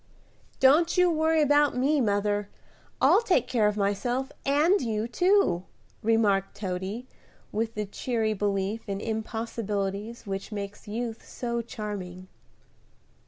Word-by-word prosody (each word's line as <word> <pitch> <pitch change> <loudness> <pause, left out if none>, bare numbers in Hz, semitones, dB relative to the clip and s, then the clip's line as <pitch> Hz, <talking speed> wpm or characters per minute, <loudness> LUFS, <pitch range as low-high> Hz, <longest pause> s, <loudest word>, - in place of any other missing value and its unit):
"Don't 315 +7 +5
you 360 -1 +5
worry 315 0 +3
about 290 -2 +3
me, 280 +3 +2
mother; 205 -1 0 0.5
I'll - - +5
take 465 - +2
care 220 -4 +2
of 210 0 -1
myself 240 +6 -1 0.2
and 305 +7 +4
you 220 -2 -1
too," 355 - +2 0.4
remarked 210 -3 +2
Toady, 190 +4 -4 0.5
with 225 +1 -2
the 210 0 -2
cheery 220 +1 -1
belief 200 +1 -2
in 195 0 -2
impossibilities 220 -1 -3
which 195 +2 -5
makes 205 -1 -6
youth 230 +1 -4
so 235 -1 -3
charming. 190 -5 -6
220 Hz, 120 wpm, -27 LUFS, 200-255 Hz, 0.5 s, Don't